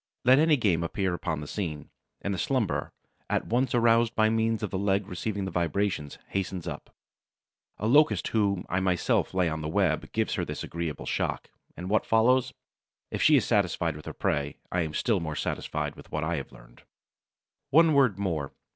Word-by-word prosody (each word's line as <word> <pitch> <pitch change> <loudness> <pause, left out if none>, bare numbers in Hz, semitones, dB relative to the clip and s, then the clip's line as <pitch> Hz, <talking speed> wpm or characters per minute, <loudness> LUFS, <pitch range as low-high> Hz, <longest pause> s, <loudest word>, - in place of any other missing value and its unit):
Let 130 +2 +7
any 155 -1 +4
game 95 -9 +2
appear 95 +2 -1
upon 80 -4 -3
the 75 - -7
scene, 80 -6 -5 0.3
and 100 - -1
the 95 - -3
slumberer, 125 -8 -1 0.4
at - - 0
once 125 +1 +1
aroused 115 -1 +3
by 110 0 +3
means 115 0 0
of 105 - -2
the 95 - -2
leg 100 0 +1
receiving 100 +2 -3
the 95 - -4
vibrations, 85 -2 -1
hastens 95 -2 -3
up. - - -6 0.9
A 105 - -4
Locust 145 +7 +4
whom 100 -4 +1
I 90 - 0
myself 90 -2 +1
lay 95 -2 +1
on 80 -1 -3
the 75 - -3
web 80 -2 0
gives - - 0
her - - -1
this - - -5
agreeable 85 -4 -4
shock, - - -2 0.3
and 90 - -6
what 110 +3 +1
follows? 125 +3 +3 0.6
If - - -3
she - - +6
is - - +3
satisfied 85 -2 +1
with 75 - -11
her - - -5
prey, 70 0 -1
I 90 - +1
am 80 -2 -3
still 110 -6 +1
more 80 -3 -4
satisfied - - -3
with - - -14
what 75 - -2
I 85 +2 -1
have 70 - -6
learned. - - -17 0.9
One 160 +2 +5
word 130 -9 +4
more. 80 -8 -2
95 Hz, 190 wpm, -28 LUFS, 85-115 Hz, 0.9 s, Let